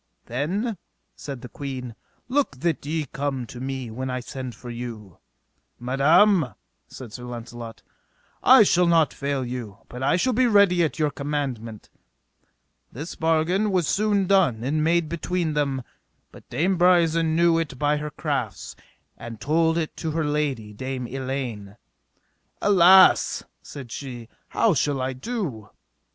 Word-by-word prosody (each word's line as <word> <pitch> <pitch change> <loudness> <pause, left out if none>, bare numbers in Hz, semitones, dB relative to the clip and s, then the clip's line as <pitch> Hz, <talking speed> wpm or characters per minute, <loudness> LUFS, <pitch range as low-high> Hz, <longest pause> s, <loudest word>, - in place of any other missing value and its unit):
Then, 185 - -2 0.4
said 135 -4 -7
the - - -8
queen, 130 -3 -6 0.3
look 260 - 0
that 170 -2 0
ye 155 0 -1
come 135 -2 -3
to 120 - -10
me 130 -2 -4
when 130 +3 -4
I 125 0 -2
send 125 0 -7
for 120 - -9
you. 115 -6 -8 0.6
Madam, 145 - +3 0.3
said 120 -5 -10
Launcelot, 120 -1 -8 0.6
I - - +8
shall 180 0 +3
not 165 -3 +3
fail 140 -2 -2
you, 120 -5 -6
but 125 - -8
I 135 - +2
shall 255 +8 +1
be 250 +2 +3
ready 200 -5 +4
at 160 - -1
your 150 -2 +1
commandment. 135 -7 -4 1.0
This 150 +8 -7
bargain 165 +6 +1
was 180 -5 +1
soon 205 -1 +1
done 180 - +2
and 150 +4 0
made 170 0 +2
between 170 0 -2
them, 140 -3 -1 0.5
but - - -16
Dame 175 +8 0
Brisen 165 -2 +3
knew 170 0 +4
it 145 -5 -4
by 150 +2 +1
her 150 0 -4
crafts, - - -4 0.4
and 115 -1 -8
told 165 +2 +2
it 160 -2 -2
to 160 - -3
her 160 -1 0
lady, 140 -8 -2
Dame 130 +3 -4
Elaine. 125 -6 -5 0.8
Alas, 190 -1 +6 0.2
said 130 -5 -10
she, 120 -4 -7 0.2
how 220 - +2
shall 145 -2 0
I 130 +1 -2
do? 135 - -5
145 Hz, 145 wpm, -24 LUFS, 125-170 Hz, 1.0 s, I